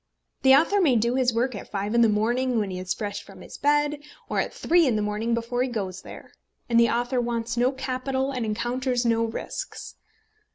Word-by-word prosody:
The 265 0 +7
author 360 +8 +3
may 285 -8 +4
do 235 +2 +2
his 255 -1 +2
work 240 +3 0
at 205 - -8
five 205 +1 -3
in 235 - +4
the 230 - +5
morning 240 +4 +1
when 205 -3 -1
he 180 - -4
is 185 0 -5
fresh 205 0 -3
from - - -14
his - - -11
bed, 295 0 +2 0.3
or - - -1
at - - -1
three 345 -2 +3
in 240 - +2
the 210 - 0
morning 215 +3 -1
before 235 +1 -2
he 255 - 0
goes 195 -6 -4
there. - - -12 0.4
And 235 -1 +3
the 235 -1 +5
author 245 +2 0
wants 235 0 -2
no 245 +2 +2
capital, 265 0 -2
and 255 -3 -3
encounters 240 +3 -1
no 230 -1 +2
risks. 230 - -6
240 Hz, 215 wpm, -25 LUFS, 225-260 Hz, 0.4 s, The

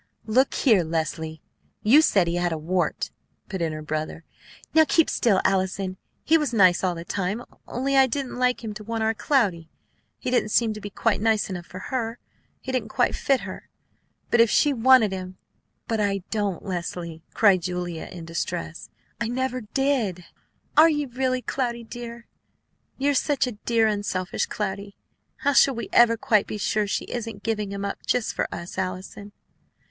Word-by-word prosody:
"Look 255 +5 +2
here! 220 -10 +4
Leslie, 160 -1 -3 0.4
you 260 +9 +7
said 195 - +3
he 170 - -1
had 175 0 0
a 160 - -1
wart!" 175 +4 -1 0.4
put 190 -3 -4
in 165 -1 0
her 155 0 -6
brother. 155 +1 -4 0.5
"Now 320 - +7
keep 325 +1 +3
still, 205 -5 +3
Allison. 190 0 0 0.3
He 325 +1 +4
was 290 -6 -1
nice 185 -4 +5
all 180 -2 +1
the 170 0 -7
time; 200 +6 -2 0.2
only 270 +3 -1
I 265 -1 +6
didn't 260 -1 -3
like 250 -1 +1
him 215 -2 -4
to 215 - -8
want 225 +1 -2
our 220 0 +2
Cloudy. 200 - +1 0.5
He 250 - -4
didn't 245 -4 +2
seem 225 0 +2
to 215 - -8
be 205 - -6
quite 205 0 0
nice 220 -2 +1
enough 175 -3 -6
for 185 - -9 0.2
her. 230 -2 -1 0.4
He 260 - -5
didn't 255 -1 -2
quite - - +1
fit 270 -2 +1
her. - - -8 0.6
But 235 - +6
if 230 - +5
she 290 +6 +3
wanted 245 -3 +5
him 185 -1 -6 0.2
" - - -49
"But 225 -2 -1
I 200 -2 0
don't, 205 -5 -2
Leslie," 170 -3 -4
cried 195 -4 +5
Julia 175 -1 -4
Cloud - - -10
in 165 - -8
distress. 110 - -4 0.3
"I 235 - -1
never 255 +1 -2
did!" 225 -7 -1 0.5
"Are 320 +2 +8
you 295 -3 -1
really 255 0 -1
true, - - -4
Cloudy, 235 -3 -2
dear? 235 0 -8 0.7
You're 285 +2 +2
such 280 +1 +1
a 250 - -3
dear, 225 +1 +1
unselfish 200 -3 -1
Cloudy. 200 -1 -4 0.5
How 285 0 +2
shall 270 0 +5
we 235 - -5
ever 230 -1 +6
quite 225 -5 +2
be - - -4
sure 210 0 0
she - - -2
isn't 225 -4 -6
giving 210 -3 -2
him 200 0 -4
up 200 - -5
just 245 -3 +1
for - - -1
us, 170 +2 -6
Allison?" 190 +2 -5
215 Hz, 185 wpm, -25 LUFS, 185-245 Hz, 0.7 s, Are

